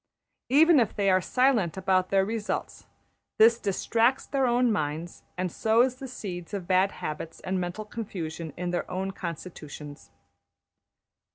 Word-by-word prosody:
Even 310 +3 +6
if 230 - +1
they 200 -1 +2
are 185 0 +4
silent 240 - +2
about 185 -1 +1
their 195 -1 +3
results, 220 0 -4 0.5
this 230 +2 +6
distracts 230 +5 +1
their 270 -2 +1
own 240 0 +3
minds, 155 -2 -3 0.2
and 180 -1 -1
sows 235 +6 +2
the 265 - -7
seeds 190 -6 -6
of 190 -3 -5
bad 190 +1 +3
habits 155 +1 -6
and 185 0 -2
mental 180 +5 -4
confusion 170 -8 -5
in 175 0 -2
their 175 - -2
own 190 +1 -2
constitutions. 155 -5 -8
195 Hz, 145 wpm, -27 LUFS, 175-230 Hz, 0.5 s, Even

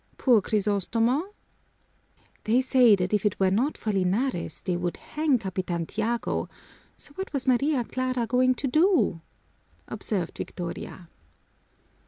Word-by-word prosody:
Poor 240 -5 +4
Crisostomo!" 225 - 0 1.1
"They 230 +4 +3
say 255 -4 +5
that 180 +1 -2
if 210 - +2
it 210 -3 0
were 190 -1 +3
not 250 +10 0
for 215 - -2
Linares, 190 - -1
they 180 - -1
would 175 0 -3
hang 300 -3 0
Capitan 185 -5 -3
Tiago, 225 +5 -2 0.5
so - - -11
what 380 +5 -6
was 275 -2 -2
Maria 265 +1 +2
Clara 255 0 -2
going 255 +2 +2
to 275 - -3
do?" 310 - +2 0.7
observed 185 -6 -4
Victoria. 175 0 -6
230 Hz, 130 wpm, -26 LUFS, 190-255 Hz, 1.1 s, say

